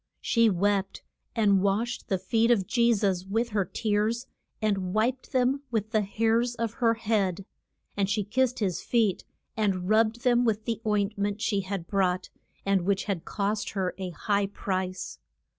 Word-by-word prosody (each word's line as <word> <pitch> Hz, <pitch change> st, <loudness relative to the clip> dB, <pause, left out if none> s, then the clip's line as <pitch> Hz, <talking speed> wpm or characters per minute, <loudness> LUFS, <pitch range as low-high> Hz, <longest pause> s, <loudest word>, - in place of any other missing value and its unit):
She 230 Hz, -1 st, +3 dB
wept, 195 Hz, +1 st, 0 dB, 0.3 s
and 200 Hz, -4 st, +4 dB
washed 215 Hz, +6 st, -1 dB
the 190 Hz, -, +2 dB
feet 225 Hz, +5 st, +1 dB
of 215 Hz, -6 st, +3 dB
Je 235 Hz, +3 st, +3 dB
sus 195 Hz, -5 st, +1 dB
with 225 Hz, +5 st, -1 dB
her 205 Hz, -3 st, +1 dB
tears, 215 Hz, +4 st, 0 dB, 0.3 s
and 195 Hz, -3 st, -1 dB
wiped 245 Hz, +4 st, 0 dB
them 260 Hz, +1 st, +2 dB
with 220 Hz, -2 st, -2 dB
the 215 Hz, -, +3 dB
hairs 225 Hz, +4 st, +1 dB
of 230 Hz, -1 st, -2 dB
her 230 Hz, -1 st, +4 dB
head. 200 Hz, -5 st, 0 dB, 0.5 s
And 200 Hz, -1 st, 0 dB
she 210 Hz, 0 st, +1 dB
kissed 255 Hz, +5 st, +1 dB
his 185 Hz, -5 st, -1 dB
feet, 220 Hz, -6 st, +1 dB, 0.3 s
and 195 Hz, -4 st, 0 dB
rubbed 220 Hz, +2 st, +3 dB
them 245 Hz, -2 st, +3 dB
with 220 Hz, -2 st, 0 dB
the 230 Hz, -2 st, -2 dB
oint 205 Hz, 0 st, 0 dB
ment 205 Hz, +1 st, -1 dB
she 205 Hz, -2 st, 0 dB
had 190 Hz, -2 st, -4 dB
brought, 185 Hz, -1 st, 0 dB, 0.3 s
and 195 Hz, -1 st, +3 dB
which 195 Hz, +2 st, 0 dB
had 195 Hz, -5 st, -3 dB
cost 205 Hz, +1 st, -1 dB
her 185 Hz, -1 st, 0 dB
a 185 Hz, -1 st, -3 dB
high 200 Hz, +3 st, 0 dB
price. 185 Hz, -2 st, -4 dB
210 Hz, 170 wpm, -27 LUFS, 195-230 Hz, 0.5 s, and